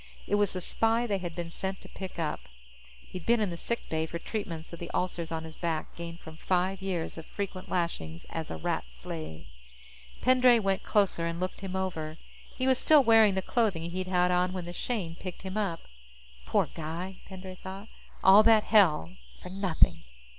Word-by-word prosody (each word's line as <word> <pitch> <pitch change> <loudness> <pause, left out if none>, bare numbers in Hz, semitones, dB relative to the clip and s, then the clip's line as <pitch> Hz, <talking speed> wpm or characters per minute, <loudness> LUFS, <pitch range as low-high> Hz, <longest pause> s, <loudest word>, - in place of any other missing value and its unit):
It - - -4
was 205 -1 +3
the 185 - -3
spy 225 +6 +2
they 200 -4 0
had 175 -3 -5
been 170 -1 -4
sent 190 +2 -3
to - - -12
pick 190 -1 -8
up. 160 -3 -1 0.6
He'd 180 - -9
been 235 +4 +3
in 210 -4 0
the - - -4
sick 235 +7 -3
bay 160 0 -1
for 170 - -4
treatments 170 -4 -5
of 170 - -7
the 170 - -6
ulcers 175 -2 -2
on 160 0 -2
his 160 -1 -9
back 165 -2 -2
gained 170 0 -7
from 160 0 -11
five 185 +2 0
years 180 -4 -3
of 160 - -9
frequent 195 -2 -5
lashings 85 - -2
as 160 -1 -4
a 80 - -4
Rat 80 - -1
slave. 80 +5 -7 0.7
Pendray 255 -1 +6
went 195 -3 +1
closer 195 -5 +2
and 170 0 -3
looked 185 0 -3
him 190 -1 -5
over. 165 -5 -3 0.4
He 255 - -1
was 260 -1 +4
still 305 -3 +6
wearing 225 -4 +6
the 190 - 0
clothing 185 -9 0
he'd 185 +1 -3
had 180 -1 +3
on 180 +1 +2
when 180 -2 -4
the 175 - -6
Shane 190 -6 -2
picked 185 -1 -7
him 190 0 -5
up. 195 -6 -1 0.7
Poor - - +3
guy, 170 +4 -5
Pendray 190 -1 -8
thought. 195 +3 -7 0.4
_All 195 +3 +9
that 220 -1 +6
hell 155 - +4 0.3
for - - -7
nothing. 190 -3 +2
185 Hz, 195 wpm, -29 LUFS, 165-200 Hz, 0.7 s, All